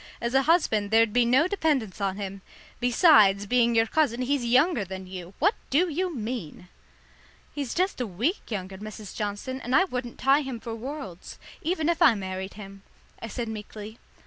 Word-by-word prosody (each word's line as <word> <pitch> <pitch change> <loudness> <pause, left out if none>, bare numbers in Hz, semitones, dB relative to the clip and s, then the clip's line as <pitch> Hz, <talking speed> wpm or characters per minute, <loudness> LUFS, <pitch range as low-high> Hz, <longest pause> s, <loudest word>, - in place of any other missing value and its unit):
As 235 +1 -3
a 270 - +5
husband 265 - +2
there'd 225 0 +4
be 245 -1 +4
no 260 +8 +4
dependence 295 - -1
on 195 -1 -1
him. 195 -1 -6 0.4
Besides 230 - +5
being 235 +1 +2
your 225 0 +4
cousin, 255 -2 +1
he's 275 0 0
younger 255 - +3
than 190 0 -7
you. 185 0 -9
What 400 +7 +3 0.2
do 340 +7 +2
you 350 +2 -2
mean?" 215 - -6 0.8
"He's 280 -4 -4
just 370 -6 0
a 245 - -1
week 235 - -2
younger, 190 -3 -5
Mrs. 215 -1 -9
Johnson, 210 +6 -4
and 250 +2 -1
I 380 - +6
wouldn't 250 -9 -5
tie 275 +3 +3
him 265 -4 -5
for 230 0 -6
worlds, 230 - -7 0.2
even 320 -2 -1
if 340 -1 0
I 235 - +7
married 190 -1 -5
him," 195 -1 -11 0.4
I - - -5
said 235 +1 -4
meekly. 215 0 -8
235 Hz, 180 wpm, -26 LUFS, 205-280 Hz, 0.8 s, I